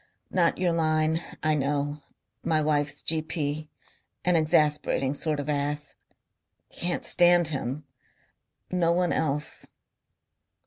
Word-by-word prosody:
"Not 175 Hz, -3 st, +2 dB
your 180 Hz, -1 st, +1 dB
line. 160 Hz, 0 st, +1 dB, 0.2 s
I 155 Hz, 0 st, +3 dB
know.... 145 Hz, +1 st, -1 dB, 0.4 s
My 160 Hz, -1 st, +2 dB
wife's 150 Hz, -1 st, 0 dB
G.P. 155 Hz, -1 st, -1 dB, 0.6 s
an 180 Hz, -1 st, +3 dB
exasperating 150 Hz, -3 st, +2 dB
sort 150 Hz, 0 st, -1 dB
of 145 Hz, -, -4 dB
ass. 145 Hz, 0 st, 0 dB, 0.8 s
Can't 175 Hz, 0 st, -1 dB
stand 175 Hz, -2 st, +4 dB
him. 140 Hz, 0 st, -4 dB, 0.9 s
No 175 Hz, -2 st, +2 dB
one 175 Hz, 0 st, +1 dB
else." 150 Hz, -1 st, -1 dB
155 Hz, 105 wpm, -26 LUFS, 145-165 Hz, 0.9 s, stand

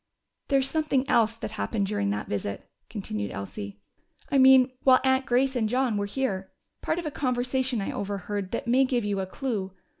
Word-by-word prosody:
"There's 270 Hz, -2 st, +2 dB
something 295 Hz, -4 st, 0 dB
else 225 Hz, -1 st, +3 dB
that 220 Hz, -, -5 dB
happened 215 Hz, -1 st, -1 dB
during 195 Hz, -, -1 dB
that 105 Hz, +1 st, -2 dB
visit," 100 Hz, -1 st, -4 dB, 0.2 s
continued 105 Hz, -, -4 dB
Elsie. 100 Hz, +1 st, -7 dB, 0.5 s
"I 275 Hz, -, +4 dB
mean, 260 Hz, -1 st, +7 dB
while 260 Hz, -1 st, +6 dB
Aunt 265 Hz, -1 st, +2 dB
Grace 260 Hz, +2 st, +2 dB
and 220 Hz, -3 st, +1 dB
John 250 Hz, -1 st, +1 dB
were 205 Hz, 0 st, -1 dB
here. 200 Hz, -5 st, -2 dB, 0.3 s
Part 315 Hz, -, -1 dB
of 345 Hz, -, -4 dB
a 305 Hz, -, -2 dB
conversation 250 Hz, -2 st, 0 dB
I -, -, -3 dB
overhead 200 Hz, 0 st, -4 dB
that 230 Hz, -, -3 dB
may 250 Hz, +3 st, +4 dB
give 250 Hz, -4 st, 0 dB
you 200 Hz, -1 st, -1 dB
a 190 Hz, -, -2 dB
clue. 200 Hz, -4 st, -3 dB
235 Hz, 185 wpm, -27 LUFS, 195-265 Hz, 0.5 s, mean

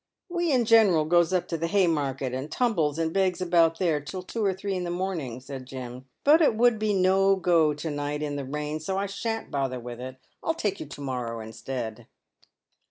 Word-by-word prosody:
" -, -, -60 dB
"We 345 Hz, -2 st, +1 dB
in 250 Hz, -3 st, +3 dB
general 210 Hz, -9 st, +5 dB
goes 175 Hz, +2 st, +3 dB
up 185 Hz, -2 st, 0 dB
to 165 Hz, -, -2 dB
the 165 Hz, -, 0 dB
Haymarket, 145 Hz, -9 st, +1 dB
and 130 Hz, +3 st, -4 dB
tumbles 170 Hz, -, +1 dB
and 165 Hz, 0 st, -1 dB
begs 190 Hz, -2 st, +1 dB
about 170 Hz, -2 st, +3 dB
there 165 Hz, -4 st, +1 dB
until 165 Hz, +6 st, -6 dB
two 225 Hz, +4 st, -3 dB
or 195 Hz, -, +3 dB
three 195 Hz, +1 st, -4 dB
in 180 Hz, -1 st, -2 dB
the 175 Hz, -, -3 dB
morning," 175 Hz, -9 st, -3 dB
said 130 Hz, 0 st, -8 dB
Jim, 125 Hz, -1 st, -8 dB, 0.2 s
"but 305 Hz, +4 st, +6 dB
it 290 Hz, -8 st, +4 dB
would 235 Hz, -1 st, +3 dB
be 215 Hz, -1 st, +1 dB
no 195 Hz, 0 st, +4 dB
go 165 Hz, -5 st, +3 dB
to 150 Hz, +2 st, -4 dB
night 145 Hz, +1 st, -3 dB
in 145 Hz, -1 st, -3 dB
the 140 Hz, -, -3 dB
rain, 150 Hz, +3 st, -3 dB
so 190 Hz, +5 st, -3 dB
I 200 Hz, -, 0 dB
shan't 225 Hz, +3 st, -4 dB
bother 135 Hz, -3 st, -1 dB
with 120 Hz, 0 st, -8 dB
it. 130 Hz, 0 st, -6 dB, 0.3 s
I'll 325 Hz, -, -1 dB
take 205 Hz, -, -2 dB
you -, -, -6 dB
to 145 Hz, 0 st, -9 dB
morrow 125 Hz, -4 st, -3 dB
instead." 110 Hz, +1 st, -6 dB
165 Hz, 220 wpm, -27 LUFS, 140-195 Hz, 0.3 s, but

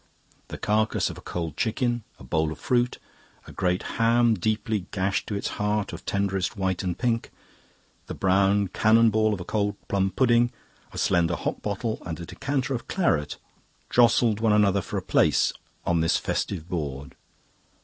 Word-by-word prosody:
The -, -, -7 dB
carcase 110 Hz, +1 st, +1 dB
of -, -, -10 dB
a -, -, -13 dB
cold 85 Hz, -4 st, -4 dB
chicken, 120 Hz, +1 st, 0 dB
a -, -, -14 dB
bowl 80 Hz, +4 st, 0 dB
of 80 Hz, -, -6 dB
fruit, 125 Hz, -1 st, 0 dB, 0.5 s
a -, -, -11 dB
great 90 Hz, -1 st, 0 dB
ham, 115 Hz, +1 st, +3 dB
deeply 110 Hz, -1 st, -1 dB
gashed 95 Hz, 0 st, -1 dB
to 105 Hz, -, -3 dB
its 100 Hz, -, -2 dB
heart 105 Hz, -1 st, 0 dB
of -, -, -9 dB
tenderest 100 Hz, 0 st, -1 dB
white 95 Hz, -2 st, -1 dB
and 90 Hz, -2 st, -3 dB
pink, 115 Hz, -2 st, 0 dB, 0.8 s
the -, -, -5 dB
brown 100 Hz, +1 st, +2 dB
cannon 110 Hz, +4 st, +4 dB
ball 110 Hz, 0 st, +2 dB
of 105 Hz, -, -2 dB
a 90 Hz, -, -6 dB
cold 105 Hz, -1 st, -1 dB
plum 95 Hz, -1 st, +1 dB
pudding, 120 Hz, +1 st, +3 dB, 0.4 s
a -, -, -10 dB
slender 85 Hz, -2 st, +2 dB
Hock -, -, -3 dB
bottle, 110 Hz, +2 st, -3 dB
and 85 Hz, -2 st, -5 dB
a 85 Hz, -, -6 dB
decanter 135 Hz, -, -2 dB
of 120 Hz, -, -4 dB
claret 80 Hz, -, 0 dB, 0.5 s
jostled 115 Hz, -2 st, +4 dB
one 110 Hz, -1 st, +3 dB
another 100 Hz, -2 st, +3 dB
for -, -, -5 dB
a -, -, -3 dB
place -, -, +3 dB, 0.3 s
on 85 Hz, -1 st, +2 dB
this 80 Hz, -, +2 dB
festive 85 Hz, -5 st, -3 dB
board. 70 Hz, -6 st, -4 dB
100 Hz, 170 wpm, -26 LUFS, 90-115 Hz, 0.8 s, cannon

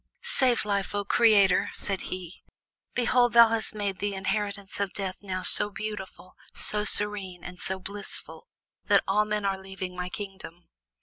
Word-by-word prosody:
"Save 260 Hz, -, +2 dB
Life, 200 Hz, -1 st, -1 dB
O 205 Hz, 0 st, -1 dB
Creator!" 205 Hz, -4 st, +4 dB
said 195 Hz, -2 st, -2 dB
he. 185 Hz, -1 st, -6 dB, 0.5 s
"Behold, 245 Hz, 0 st, +3 dB
thou 235 Hz, -1 st, +8 dB
hast 225 Hz, -1 st, 0 dB
made 200 Hz, -2 st, -3 dB
the 205 Hz, -1 st, -2 dB
inheritance 200 Hz, 0 st, -3 dB
of 200 Hz, -2 st, -2 dB
Death 190 Hz, -2 st, -2 dB
now 185 Hz, -2 st, -4 dB
so 205 Hz, -, +6 dB
beautiful, 210 Hz, -3 st, -7 dB, 0.2 s
so 210 Hz, 0 st, +2 dB
serene, 200 Hz, -4 st, -2 dB
and 180 Hz, 0 st, -9 dB
so 190 Hz, +1 st, -3 dB
blissful 205 Hz, -, -5 dB, 0.4 s
that -, -, +4 dB
all 210 Hz, +2 st, +2 dB
men 210 Hz, -1 st, -2 dB
are 195 Hz, -1 st, -1 dB
leaving 190 Hz, -1 st, -7 dB
my 180 Hz, 0 st, -4 dB
kingdom." 190 Hz, -3 st, -9 dB
200 Hz, 160 wpm, -27 LUFS, 190-210 Hz, 0.5 s, thou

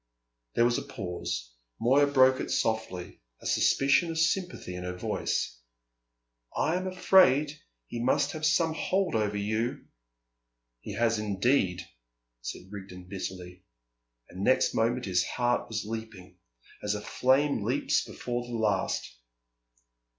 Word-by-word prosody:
There 120 Hz, -, +4 dB
was 120 Hz, 0 st, +2 dB
a -, -, -5 dB
pause. -, -, -5 dB, 0.3 s
Moya 135 Hz, +5 st, +4 dB
broke 130 Hz, -2 st, +5 dB
it -, -, -3 dB
softly, 110 Hz, -, -2 dB, 0.2 s
a -, -, -15 dB
suspicion 135 Hz, -, +3 dB
of 165 Hz, -, -3 dB
sympathy 165 Hz, -, 0 dB
in 90 Hz, 0 st, -6 dB
her 90 Hz, 0 st, -4 dB
voice. -, -, -2 dB, 1.0 s
"I 160 Hz, -, +2 dB
am 185 Hz, +1 st, -2 dB
afraid 180 Hz, -6 st, +4 dB, 0.3 s
he 115 Hz, -, -5 dB
must 130 Hz, -, +2 dB
have 155 Hz, -3 st, -7 dB
some 160 Hz, +1 st, +3 dB
hold 185 Hz, +3 st, 0 dB
over 105 Hz, -2 st, 0 dB
you." 110 Hz, +4 st, -2 dB, 0.9 s
"He 100 Hz, -, -7 dB
has 115 Hz, 0 st, +2 dB
indeed," 100 Hz, -3 st, +1 dB, 0.5 s
said 90 Hz, +10 st, -7 dB
Rigden 95 Hz, -3 st, -9 dB
bitterly; 90 Hz, -2 st, -6 dB, 0.7 s
and 95 Hz, +2 st, -7 dB
next 130 Hz, -, +3 dB
moment 120 Hz, +2 st, +1 dB
his 90 Hz, -2 st, +2 dB
heart 120 Hz, +4 st, 0 dB
was 110 Hz, -2 st, -3 dB
leaping, 105 Hz, -5 st, -7 dB, 0.4 s
as 105 Hz, 0 st, -1 dB
a 105 Hz, -, -4 dB
flame 135 Hz, +6 st, +2 dB
leaps -, -, +1 dB
before 120 Hz, 0 st, -4 dB
the 120 Hz, -, -5 dB
last. 110 Hz, -2 st, 0 dB
115 Hz, 135 wpm, -29 LUFS, 95-140 Hz, 1.0 s, broke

